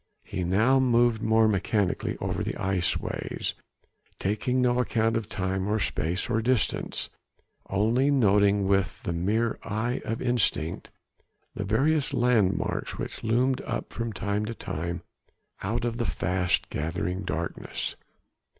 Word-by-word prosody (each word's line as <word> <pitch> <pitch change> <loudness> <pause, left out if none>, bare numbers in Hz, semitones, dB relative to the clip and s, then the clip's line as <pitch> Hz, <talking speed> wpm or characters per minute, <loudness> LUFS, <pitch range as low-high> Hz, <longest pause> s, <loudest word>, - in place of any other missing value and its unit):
He 90 - -4
now 110 +10 +4
moved 120 -3 +3
more 110 0 +4
mechanically 100 -1 0
over - - -2
the - - -3
iceways, 95 -2 -1 0.6
taking 110 +6 0
no 125 -1 +3
account 115 -2 +1
of 115 -3 -2
time 95 0 -1
or 105 +1 +1
space 90 -2 0
or 110 - +1
distance, 120 -3 0 0.6
only 115 +8 +2
noting 100 -6 +4
with 100 -1 +1
the 85 - -2
mere 105 +7 0
eye 120 +5 -2
of 115 - -3
instinct 115 -10 0 0.6
the 100 - -4
various 135 +8 +2
landmarks 115 -6 +1
which - - -5
loomed 125 +4 +2
up - - -4
from 115 -1 -3
time 100 +1 -1
to 115 +1 -4
time 85 -1 -4 0.6
out 115 +5 -1
of 120 -1 -2
the 120 - -1
fast 90 +1 0
gathering 85 +4 -2
darkness. 85 -3 -3
110 Hz, 130 wpm, -27 LUFS, 95-120 Hz, 0.6 s, now